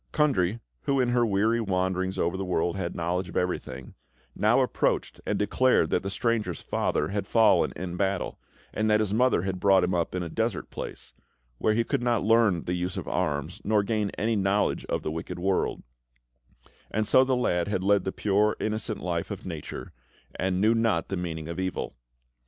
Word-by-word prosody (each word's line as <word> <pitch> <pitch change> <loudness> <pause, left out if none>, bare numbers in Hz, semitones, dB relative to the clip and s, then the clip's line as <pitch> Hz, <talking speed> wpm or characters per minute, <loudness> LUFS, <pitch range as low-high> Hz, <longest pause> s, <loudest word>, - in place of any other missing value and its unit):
Kundry, 120 - +2 0.3
who, 140 -1 +2
in 125 -2 +2
her 120 0 +3
weary 110 +2 +2
wanderings 95 -1 -1
over 85 0 0
the 95 - -3
world, 85 -2 0
had 95 -3 -3
knowledge 90 +2 -1
of - - -5
everything, 90 -7 -3 0.4
now - - +3
approached - - 0
and - - 0
declared 130 +5 +2
that - - +2
the 95 - -4
stranger's 105 -5 -1
father 75 - 0
had 100 0 -3
fallen 115 -2 +4
in 90 -1 -5
battle, 95 -1 -1 0.3
and 110 +1 0
that 105 0 +4
his 105 -2 0
mother 125 -5 +3
had 95 -1 -3
brought 95 -1 +5
him 90 +1 0
up 85 +1 -1
in 90 - -1
a - - -4
desert 110 +4 -2
place, - - -7 0.5
where 110 - +2
he 115 - +2
could 115 - -1
not 120 -3 +1
learn 110 -5 +3
the 90 - -2
use 90 +1 -2
of - - -5
arms, 70 -1 -2
nor 105 -1 +2
gain 105 -1 0
any 110 +3 +1
knowledge 100 0 +1
of - - -2
the 75 - -2
wicked 80 +2 -5
world; 95 +1 0 1.1
and 110 0 -1
so 130 +5 +6
the 130 0 +1
lad 90 -8 +1
had 95 -3 -1
led 100 +1 +3
the 95 - -2
pure, 105 +2 +1
innocent 110 0 -2
life - - -2
of - - -6
nature, - - -7 0.4
and 95 -1 -1
knew 110 +3 +4
not 115 -7 +1
the 95 - -1
meaning 80 -3 -4
of 85 +2 -5
evil. 95 -1 -3
95 Hz, 195 wpm, -27 LUFS, 90-110 Hz, 1.1 s, so